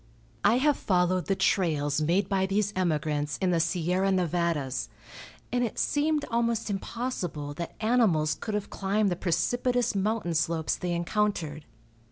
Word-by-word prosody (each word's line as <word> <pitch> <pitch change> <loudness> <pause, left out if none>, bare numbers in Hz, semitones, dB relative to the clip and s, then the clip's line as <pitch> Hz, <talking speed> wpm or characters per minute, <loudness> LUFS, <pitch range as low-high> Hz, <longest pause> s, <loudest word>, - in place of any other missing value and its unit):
I 215 +4 +5
have 290 +2 +3
followed 180 -1 +1
the 195 - +2
trails 155 -7 +1
made 180 +5 +2
by 190 -1 +1
these 205 +1 0
emigrants 150 -4 0
in 185 -2 +1
the 170 - +2
Sierra 180 +3 +1
Nevadas, 170 -6 0 0.6
and 245 0 +1
it 230 - -3
seemed 295 0 +1
almost 230 -2 0
impossible 190 - -4
that 170 +3 -6
animals 215 -10 +3
could 215 -2 -4
have 210 -1 -3
climbed 200 +1 0
the - - 0
precipitous 245 +10 0
mountain 200 -2 -1
slopes 160 0 0
they 180 -1 -3
encountered. 170 -4 -1
185 Hz, 145 wpm, -28 LUFS, 165-215 Hz, 0.6 s, I